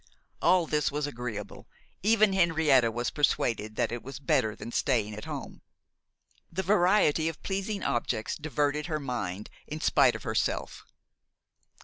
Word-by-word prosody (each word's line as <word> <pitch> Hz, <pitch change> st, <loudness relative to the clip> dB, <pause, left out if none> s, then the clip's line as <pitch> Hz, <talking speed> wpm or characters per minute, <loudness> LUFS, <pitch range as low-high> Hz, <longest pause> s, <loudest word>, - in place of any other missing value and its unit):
All 175 Hz, 0 st, +4 dB
this 150 Hz, -2 st, 0 dB
was 145 Hz, 0 st, -1 dB
agreeable; 115 Hz, -6 st, -6 dB, 0.3 s
even 215 Hz, -1 st, +4 dB
Henrietta 160 Hz, -9 st, +4 dB
was 120 Hz, +1 st, -2 dB
persuaded 110 Hz, -7 st, 0 dB
that -, -, 0 dB
it 120 Hz, 0 st, -4 dB
was 135 Hz, +1 st, -8 dB
better 110 Hz, -5 st, +1 dB
than 115 Hz, -, -8 dB
staying 115 Hz, -6 st, 0 dB
at 105 Hz, -, -7 dB
home. -, -, -7 dB, 0.9 s
The 190 Hz, +3 st, -2 dB
variety 180 Hz, -4 st, +3 dB
of 165 Hz, -, -10 dB
pleasing 195 Hz, +1 st, -2 dB
objects 110 Hz, -2 st, -1 dB
diverted 150 Hz, 0 st, -1 dB
her 155 Hz, -3 st, -2 dB
mind 105 Hz, -8 st, -4 dB, 0.2 s
in -, -, -5 dB
spite -, -, +4 dB
of -, -, -7 dB
herself. -, -, -2 dB
145 Hz, 140 wpm, -28 LUFS, 120-170 Hz, 0.9 s, All